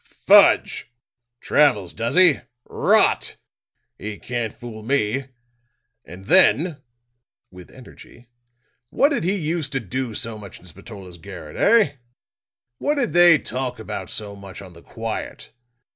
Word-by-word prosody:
"Fudge! - - +3 0.5
Travels, 115 -12 +2
does 115 +4 -3
he? 180 -6 +5 0.3
Rot! - - +1 0.6
He 105 +1 -6
can't 120 -1 -4
fool 115 -2 -10
me. 130 +1 -1 0.8
And 90 +3 -13
then," 170 - +3 0.7
with 90 -1 -14
energy, 125 -1 -16 0.6
"what 280 - +2
did 285 - -2
he 185 +4 0
used 160 -4 -3
to 135 - 0
do 120 +1 -5
so 110 0 -5
much 100 -3 -12
in - - -20
Spatola's 95 0 -12
garret, 85 -4 -11
eh? 215 -10 +3 0.8
What 295 - 0
did 245 - -1
they 175 -2 +7
talk 125 -2 -5
about 110 - -7
so 105 -2 -7
much 100 0 -11
on 95 -3 -12
the 85 - -16
quiet? 115 +3 -7
115 Hz, 130 wpm, -21 LUFS, 100-150 Hz, 0.8 s, they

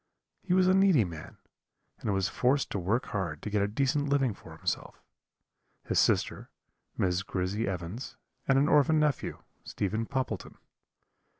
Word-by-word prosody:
He 180 -1 +1
was 185 -1 +4
a 185 - +5
needy 190 - +5
man, 85 -5 -8 0.6
and - - -2
was 95 -1 +1
forced 130 +9 +1
to 100 - -1
work 105 +8 0
hard 85 -7 -3
to 105 - -4
get 105 -1 +2
a 100 - +2
decent 140 +6 0
living 135 -5 +2
for - - -13
himself, - - -3 0.8
his - - +1
sister, - - +1 0.5
Miss 90 0 +1
Grizzy 95 +3 -2
Evans, 90 +6 -5 0.3
and 135 - +4
an 140 +2 +4
orphan 150 +1 +4
nephew, 150 -4 -1 0.2
Stephen 110 +3 -2
Poppleton. 130 -8 -3
115 Hz, 155 wpm, -29 LUFS, 95-140 Hz, 0.8 s, a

